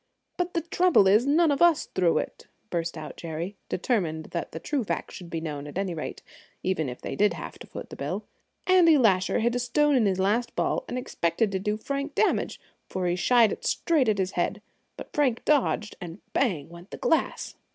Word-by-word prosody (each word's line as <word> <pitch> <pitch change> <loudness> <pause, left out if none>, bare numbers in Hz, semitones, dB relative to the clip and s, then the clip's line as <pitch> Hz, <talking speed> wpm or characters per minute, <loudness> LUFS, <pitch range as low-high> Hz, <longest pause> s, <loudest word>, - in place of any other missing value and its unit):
"But 355 0 -2
the 335 - +2
trouble 340 - +4
is, 215 +7 +4
none 315 +2 +4
of 280 - -1
us 340 -3 +5
threw 175 -3 +1
it!" - - -4 0.2
burst 170 -1 -2
out 155 -1 -8
Jerry, 170 +4 -5
determined 170 -7 -1
that 170 - -4
the 160 - -6
true 275 - -1
facts - - -3
should 175 -2 -9
be 165 - -3
known 150 -3 -5
at 145 - -7
any 195 -2 -1
rate, 155 - -6 0.4
even 160 -7 0
if 125 - -7
they - - -5
did 210 0 +3
have - - -8
to - - -11
foot - - -9
the - - -7
bill. - - -4 0.4
"Andy 350 -4 +6
Lasher 190 -7 +3
hid 235 +1 +2
a 245 - 0
stone 285 +4 +2
in 230 -5 +4
his 190 -2 +1
last 210 +6 0
ball, - - 0
and 250 - -4
expected 200 -4 0
to 190 - -1
do 210 +2 -1
Frank 280 +5 -4
damage, 430 - +1 0.3
for 185 -1 -2
he 175 0 +1
shied 230 +4 +4
it - - -6
straight 305 -9 +2
at 210 - +2
his 190 -1 0
head; 200 +4 -2 0.3
but - - -9
Frank 265 -6 +1
dodged, 270 -7 +1
and 170 -1 -7 0.2
bang 180 - +1
went 170 +3 -13
the - - -7
glass!" 320 - 0
210 Hz, 215 wpm, -27 LUFS, 175-275 Hz, 0.4 s, Andy